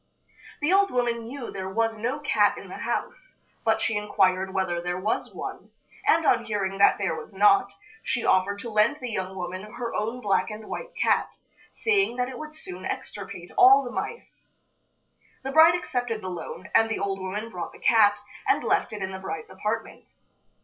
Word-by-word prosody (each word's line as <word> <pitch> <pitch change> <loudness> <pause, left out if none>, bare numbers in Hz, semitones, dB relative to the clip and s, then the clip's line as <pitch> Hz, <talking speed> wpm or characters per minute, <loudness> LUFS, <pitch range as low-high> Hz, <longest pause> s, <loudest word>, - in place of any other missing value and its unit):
The 300 +5 +2
old 395 0 +5
woman 235 -2 -1
knew 260 0 -6
there 190 -1 -5
was 225 +3 0
no 245 +7 -2
cat 290 - +3
in - - -10
the - - -7
house, - - -4 0.3
but 220 -1 +2
she 225 0 0
inquired 190 -2 +1
whether 180 -2 -1
there 180 +1 -2
was 210 +4 -1
one, - - -7 0.4
and 325 0 +4
on - - +3
hearing 195 -2 -2
that 200 - +6
there 190 -5 -1
was 160 +5 -9
not, 200 0 +5 0.3
she 240 - -2
offered 190 +2 +3
to 235 - -6
lend 215 +6 +3
the 250 -2 -5
young 190 -2 -3
woman 185 0 -5
her 235 -2 -4
own 225 +4 -2
black 205 -3 +1
and 215 0 -8
white - - -6
cat, - - +1 0.4
saying 400 - +1
that 250 0 -1
it 255 - -8
would 310 0 -8
soon 185 - -8
extirpate 185 -3 -6
all 270 +2 +8
the 245 - -6
mice. 465 - -6 0.9
The 270 - -3
bride 320 +3 +7
accepted 245 -9 -2
the 185 - -5
loan, 180 +2 -7
and 225 0 +5
the 225 - -1
old 195 -1 -2
woman 205 +4 -4
brought 180 -3 -5
the - - -14
cat, 210 -3 +5 0.3
and - - +3
left - - +1
it 205 -2 -4
in 190 - -3
the 190 - -6
bride's 160 -4 -6
apartment. 210 +4 -4
215 Hz, 190 wpm, -26 LUFS, 190-245 Hz, 0.9 s, all